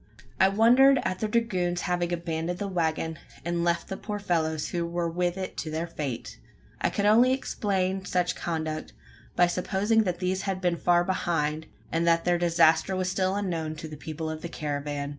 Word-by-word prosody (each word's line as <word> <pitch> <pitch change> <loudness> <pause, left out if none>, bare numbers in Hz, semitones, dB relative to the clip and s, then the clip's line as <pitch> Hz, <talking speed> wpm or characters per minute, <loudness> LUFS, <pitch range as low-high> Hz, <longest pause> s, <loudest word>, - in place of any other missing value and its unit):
I 190 - +6
wondered 250 +6 +6
at 185 0 -2
the 215 - 0
dragoons 185 -6 0
having 175 -1 -1
abandoned 170 0 -2
the 200 - -3
waggon, 160 -3 -1 0.3
and 170 0 0
left 170 -1 0
the 195 - -5
poor 210 -1 -4
fellows 160 -6 -1
who 170 -1 -1
were 170 0 -2
with 175 +2 -1
it 190 -1 -5
to 160 - -3
their 160 +2 -2
fate! 140 - -5 0.4
I - - +2
could 200 - -1
only 235 +5 +6
explain 195 -7 -1
such 180 -2 0
conduct, 155 -2 -3 0.4
by 175 - +5
supposing 195 +5 +1
that 180 -2 -1
these 185 +1 -1
had 195 -1 -2
been 175 -2 0
far 175 0 +3
behind, 160 -4 -1 0.2
and 165 +1 0
that 165 0 +3
their 175 -1 +2
disaster 170 +1 +3
was 185 0 -1
still 190 0 0
unknown 165 -6 -2
to 160 +1 -7
the 155 - -8
people 160 +2 -5
of 155 0 -4
the 170 - -5
caravan. 145 -2 -3
175 Hz, 190 wpm, -27 LUFS, 160-190 Hz, 0.4 s, I